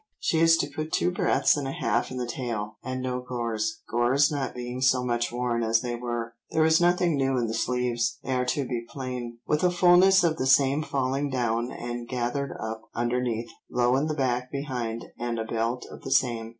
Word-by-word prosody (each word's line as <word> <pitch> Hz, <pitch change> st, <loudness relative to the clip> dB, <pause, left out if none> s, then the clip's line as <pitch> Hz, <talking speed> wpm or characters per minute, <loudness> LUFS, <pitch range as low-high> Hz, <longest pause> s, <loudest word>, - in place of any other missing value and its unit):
She 160 Hz, -, 0 dB
is 165 Hz, 0 st, +6 dB
to 145 Hz, -, 0 dB
put 155 Hz, +2 st, -5 dB
two 180 Hz, -, +1 dB
breadths 180 Hz, -, +3 dB
and 145 Hz, -2 st, -3 dB
a -, -, -2 dB
half 115 Hz, +1 st, 0 dB
in 130 Hz, -, -6 dB
the 125 Hz, -, -2 dB
tail, 115 Hz, -3 st, -4 dB
and 130 Hz, 0 st, -4 dB
no 125 Hz, -1 st, -2 dB
gores—gores 120 Hz, +3 st, 0 dB
not 140 Hz, -3 st, -3 dB
being 125 Hz, +1 st, -5 dB
so 130 Hz, -1 st, +3 dB
much 120 Hz, -1 st, 0 dB
worn 120 Hz, -1 st, -1 dB
as 115 Hz, 0 st, +2 dB
they 120 Hz, -1 st, -3 dB
were. 120 Hz, -1 st, -4 dB, 0.2 s
There 155 Hz, 0 st, +2 dB
is 160 Hz, +1 st, +4 dB
nothing 175 Hz, -1 st, +3 dB
new 135 Hz, -1 st, +1 dB
in 120 Hz, -, +1 dB
the 110 Hz, -, -3 dB
sleeves; 120 Hz, 0 st, 0 dB
they 130 Hz, -, -2 dB
are 125 Hz, 0 st, +1 dB
to 135 Hz, +1 st, -1 dB
be 120 Hz, -2 st, -3 dB
plain, 125 Hz, -3 st, -5 dB
with 150 Hz, +2 st, 0 dB
a 180 Hz, -, +5 dB
fulness 180 Hz, +2 st, +5 dB
of 165 Hz, -2 st, +2 dB
the 130 Hz, -, -1 dB
same 135 Hz, +2 st, +4 dB
falling 140 Hz, -1 st, -1 dB
down 120 Hz, -1 st, -1 dB
and 120 Hz, 0 st, -5 dB
gathered 130 Hz, +2 st, -2 dB
up 110 Hz, 0 st, -4 dB
underneath. 120 Hz, -1 st, -1 dB, 0.2 s
Low 125 Hz, +1 st, +2 dB
in 140 Hz, +3 st, +1 dB
the 155 Hz, -, -2 dB
back 125 Hz, -2 st, -1 dB
behind, 125 Hz, -5 st, -3 dB
and 120 Hz, -1 st, -2 dB
a 110 Hz, -, -2 dB
belt 115 Hz, +2 st, -2 dB
of -, -, -10 dB
the -, -, -6 dB
same." 120 Hz, -4 st, +1 dB
125 Hz, 210 wpm, -26 LUFS, 120-140 Hz, 0.2 s, is